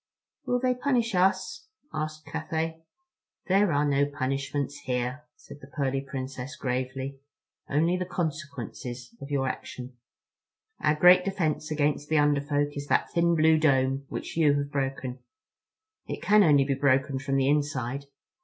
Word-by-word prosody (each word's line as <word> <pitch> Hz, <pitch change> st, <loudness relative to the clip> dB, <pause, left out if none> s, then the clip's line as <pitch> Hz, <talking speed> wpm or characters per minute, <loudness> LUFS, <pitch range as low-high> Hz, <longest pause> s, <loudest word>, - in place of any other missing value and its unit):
"Will 245 Hz, 0 st, +2 dB
they 255 Hz, 0 st, +2 dB
punish 245 Hz, -3 st, 0 dB
us?" 190 Hz, -, +1 dB, 0.3 s
asked 155 Hz, 0 st, -4 dB
Cathay. 160 Hz, +1 st, -3 dB, 0.6 s
"There 195 Hz, 0 st, +3 dB
are 145 Hz, +1 st, +2 dB
no 140 Hz, 0 st, +2 dB
punishments 140 Hz, 0 st, -2 dB
here," 125 Hz, +3 st, -2 dB
said 145 Hz, -, -13 dB
the -, -, -11 dB
pearly 135 Hz, -2 st, -1 dB
Princess 135 Hz, -1 st, -6 dB
gravely, 130 Hz, +1 st, -3 dB, 0.5 s
"only 165 Hz, +5 st, +2 dB
the 180 Hz, -1 st, -3 dB
consequences 140 Hz, -7 st, -5 dB
of 140 Hz, -, -7 dB
your 135 Hz, -2 st, 0 dB
action. 125 Hz, 0 st, -6 dB, 0.8 s
Our 150 Hz, 0 st, +2 dB
great 180 Hz, +3 st, +7 dB
defense 160 Hz, -6 st, -1 dB
against 150 Hz, -1 st, 0 dB
the 155 Hz, -, +3 dB
Under 145 Hz, -1 st, +3 dB
Folk 145 Hz, 0 st, -1 dB
is 145 Hz, 0 st, -5 dB
that -, -, +1 dB
thin 170 Hz, 0 st, +3 dB
blue 160 Hz, 0 st, +4 dB
dome 135 Hz, -2 st, +2 dB
which -, -, -5 dB
you 150 Hz, -3 st, +4 dB
have 145 Hz, 0 st, -2 dB
broken. 135 Hz, -2 st, -3 dB, 0.9 s
It -, -, -5 dB
can 210 Hz, +1 st, +5 dB
only 145 Hz, -5 st, +5 dB
be 140 Hz, -, +1 dB
broken 135 Hz, 0 st, +2 dB
from 135 Hz, 0 st, -2 dB
the 135 Hz, -1 st, +2 dB
inside. 140 Hz, -2 st, 0 dB
145 Hz, 150 wpm, -27 LUFS, 135-160 Hz, 0.9 s, great